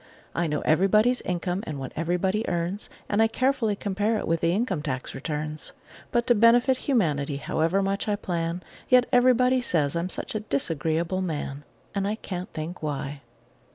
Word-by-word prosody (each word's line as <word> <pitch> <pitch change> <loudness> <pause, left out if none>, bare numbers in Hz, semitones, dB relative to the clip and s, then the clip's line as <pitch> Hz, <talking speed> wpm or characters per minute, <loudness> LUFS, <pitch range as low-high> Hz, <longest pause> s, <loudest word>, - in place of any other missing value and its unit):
I 170 0 0
know 150 -1 -1
everybody's 210 +9 +3
income 180 +2 -2
and 150 - -4
what 130 -1 -5
everybody 180 +6 0
earns, 175 +4 -2 0.2
And 205 +1 +2
I 225 - +6
carefully 235 -2 +1
compare 205 +3 0
it - - -4
with 165 0 +1
the 170 - +3
income 190 -4 0
tax 135 -4 -4
returns; 150 +2 -4 0.4
But 240 -1 +1
to 240 - +5
benefit 240 +3 +5
humanity, 155 - 0
however 165 +6 0
much 195 +2 -1
I 210 - +2
plan, 175 -3 -3 0.3
Yet 250 -1 +6
everybody 250 +1 +4
says 160 -10 +1
I'm 170 +2 -1
such - - -4
a 215 - -1
disagreeable 165 +1 -1
man! 145 -5 -4 0.3
And 200 0 -1
I 210 - 0
can't 185 -4 -6
think 160 +3 -6
why! 145 -2 -4
180 Hz, 170 wpm, -26 LUFS, 155-215 Hz, 0.4 s, I